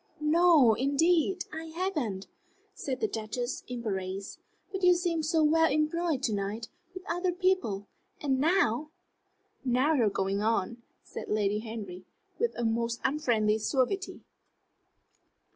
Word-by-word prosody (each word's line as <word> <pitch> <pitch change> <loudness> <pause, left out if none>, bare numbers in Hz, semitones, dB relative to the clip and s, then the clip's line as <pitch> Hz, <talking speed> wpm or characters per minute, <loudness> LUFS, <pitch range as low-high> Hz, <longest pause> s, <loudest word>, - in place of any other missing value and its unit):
"No, 305 -5 +5
indeed, 325 - +2
I 320 +1 -5
haven't," 315 - -3 0.5
said 260 -9 -4
the - - +2
Duchess, 230 +3 -4
embarrassed. 195 -5 -4 0.3
"But 385 -1 -4
you 360 -1 +6
seemed 335 -3 -1
so 320 -1 +3
well 325 +1 +4
employed 305 -1 0
to 225 - +1
night, 205 +3 -3 0.3
with 370 - -7
other 355 +1 0
people. 360 - 0 0.3
And 270 -3 0
now 300 - +2 0.4
" - - -46 0.2
"Now 260 +4 +2
you 280 - +2
are - - +3
going 195 0 -1
on," 225 +1 0 0.2
said - - -8
Lady 210 -1 +1
Henry, 215 -5 -7 0.4
with 470 - 0
a 240 - -1
most 230 +1 0
unfriendly 235 -7 +1
suavity. 275 - -1
265 Hz, 135 wpm, -29 LUFS, 220-330 Hz, 0.5 s, you